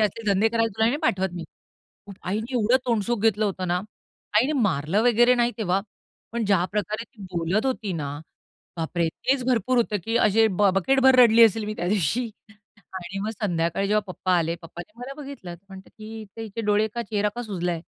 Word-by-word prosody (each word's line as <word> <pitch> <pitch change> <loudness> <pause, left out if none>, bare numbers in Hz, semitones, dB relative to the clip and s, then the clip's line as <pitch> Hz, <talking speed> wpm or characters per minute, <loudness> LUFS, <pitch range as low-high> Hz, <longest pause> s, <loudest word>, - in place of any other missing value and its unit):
असले 215 +1 0
धंदे 200 +3 +3
करायला 230 0 +1
तुला 220 0 +3
नाही 245 +5 +1
पाठवत 190 0 +1
मी. 175 -1 -6 0.8
आईनी 215 +7 -3
एवढं 240 +1 +3
तोंडसुख 235 0 0
घेतलं 220 -1 +2
होतं 190 -2 -2
ना. 175 +1 +1 0.6
आईने 260 +7 +2
मारलं 180 0 +1
वगैरे 240 +1 +5
नाही 240 -1 +2
तेव्हा, 190 -3 +1 0.5
पण 235 -1 -1
ज्या 195 -4 +2
प्रकारे 210 +2 -2
ती 230 -4 -16
बोलत 175 +7 0
होती 225 -7 -2
ना, 145 -3 -4 0.6
बापरे! 165 0 -1
तेच 260 +10 -1
भरपूर 255 0 +1
होतं, 230 -3 +1
की 225 +1 0
असे 220 0 +4
ब 200 +2 +3
बकेटभर 265 +7 +4
रडली 230 -1 +7
असेल 220 0 +2
मी 215 +1 -4
त्यादिवशी 200 - 0 0.7
आणि 185 +1 -6
मग 215 +2 -2
संध्याकाळी 170 0 0
जेव्हा 210 +1 +3
पप्पा 185 +1 -1
आले. 165 0 0
पप्पांनी 175 +4 -10
मला 260 +2 -7
बघितलं. 270 -11 -8
म्हणते 190 -1 -12
की 215 -1 -12
"हिचे 215 +1 -9
हिचे 220 0 -6
डोळे 210 0 +2
का 235 - -2
चेहरा 210 -1 -1
का 240 - -4
सुजलाय?" 175 -6 -3
210 Hz, 185 wpm, -24 LUFS, 185-230 Hz, 0.8 s, रडली